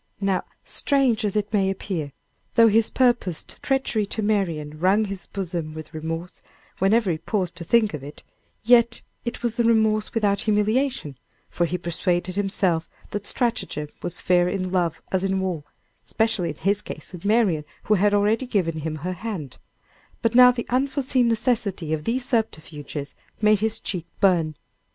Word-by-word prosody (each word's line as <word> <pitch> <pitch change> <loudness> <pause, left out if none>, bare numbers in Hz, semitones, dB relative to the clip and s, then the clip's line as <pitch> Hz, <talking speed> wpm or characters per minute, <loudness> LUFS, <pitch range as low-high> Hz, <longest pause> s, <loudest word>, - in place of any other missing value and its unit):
Now, 195 -2 0 0.2
strange 260 -5 +1
as 205 -1 -1
it 210 0 -1
may 195 -2 +3
appear, 185 -6 -3 0.4
though 230 -1 +7
his 220 +1 +3
purposed 240 -10 0
treachery 255 -6 0
to 220 - -3
Marian 165 -8 -1
wrung 195 +5 +3
his 195 -3 -6
bosom 170 -5 -4
with 155 0 -9
remorse 165 +2 -5 0.4
whenever 200 +1 +3
he 155 - -2
paused 185 -3 -2
to 170 - -5
think 215 +3 +3
of 150 - -4
it, 145 +1 -10 0.4
yet 235 0 +4 0.2
it 235 0 -4
was 235 -2 -1
the 240 - +3
remorse 220 -2 +2
without 205 -3 +2
humiliation; 215 - 0 0.3
for 175 - +1
he 180 - -2
persuaded 175 +1 -1
himself 190 -4 0 0.2
that 205 0 -4
stratagem 225 -11 -1
was 175 -1 -5
fair 180 -1 +3
in 185 -1 -2
love 175 -4 0
as 190 0 +1
in 190 0 +1
war, 180 -6 -2 0.4
especially 220 -6 0
in 155 - -5
his 200 +6 0
case - - -8
with 175 - -9
Marian, 205 -7 +2 0.2
who 215 - +2
had 205 +1 +3
already 210 +5 +2
given 170 -9 0
him 155 0 -3
her 185 - -1
hand; 180 - -6 0.6
but 230 - +2
now 250 +1 +9
the 245 -1 -1
unforseen 265 -1 +1
necessity 215 - 0
of 150 -1 -3
these 245 +2 -1
subterfuges 155 - -3 0.3
made 215 -1 +4
his 220 +1 0
cheek 175 -4 -4
burn. 170 -5 +3
200 Hz, 165 wpm, -24 LUFS, 170-225 Hz, 0.6 s, now